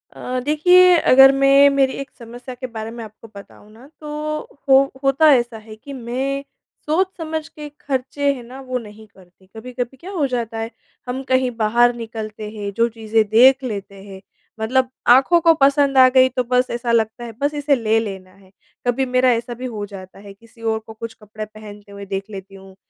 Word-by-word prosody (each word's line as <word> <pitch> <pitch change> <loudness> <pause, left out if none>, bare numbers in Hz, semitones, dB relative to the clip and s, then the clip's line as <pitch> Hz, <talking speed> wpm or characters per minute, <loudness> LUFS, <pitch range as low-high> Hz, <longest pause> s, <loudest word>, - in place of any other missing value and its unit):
अ, 255 0 -4
देखिए 360 +4 +5
अगर 270 -2 +7
मैं 275 +1 +5
मेरी 275 -1 +1
एक 275 - -8
समस्या 245 +2 -10
के 255 +1 -7
बारे 225 -2 -7
में 235 0 -8
आपको 215 +1 -13
बताऊँ 200 +1 -14
ना 235 +5 -16
तो 305 0 -4 0.3
हो 265 0 +8 0.2
होता 275 +3 +4
ऐसा 240 -3 0
है 215 0 -12
कि 280 +6 -11
मैं 265 +3 -3 0.4
सोच 335 +5 +1
समझ 315 -2 -4
के 300 -1 -10
खर्चे 280 +1 -1
हैं 250 -3 -9
ना 255 +3 -11
वो 255 - -1
नहीं 220 -1 -13
करती। 185 -1 -23
कभी-कभी 245 +2 -6
क्या 365 +9 -10
हो 325 -7 -1
जाता 235 -3 -4
है 225 +1 -5 0.4
हम 250 +2 -4
कहीं 260 -1 +2
बाहर 235 +2 +3
निकलते 220 -2 -7
हैं 205 -2 -6
जो 230 - +3
चीज़ें 220 -1 0
देख 255 +5 +5
लेते 200 -5 -6
हैं 195 -1 -11 0.4
मतलब 255 +3 +1 0.2
आँखों 270 +8 +5
को 330 0 +5
पसंद 275 0 +3
आ 260 0 +8
गई 260 0 +6
तो 250 0 -2
बस 250 +1 +1
ऐसा 235 0 -2
लगता 225 +1 0
है 235 - -7
बस 290 +1 0
इसे 290 -1 +1
ले 225 -2 +1
लेना 190 -4 -7
है। 190 0 -23 0.4
कभी 255 +2 +1
मेरा 255 0 +2
ऐसा 235 +1 -2
भी 250 +2 -8
हो 215 -5 -5
जाता 195 -2 -12
है 200 0 -12
किसी 230 +3 -21
और 220 -1 -1
को 220 - -9
कुछ 225 +1 -8
कपड़े 215 +1 -8
पहनते 210 -1 -13
हुए 200 0 -9
देख 195 0 -4
लेती 195 -1 -10
हूँ 190 0 -15
240 Hz, 200 wpm, -20 LUFS, 215-270 Hz, 0.4 s, हो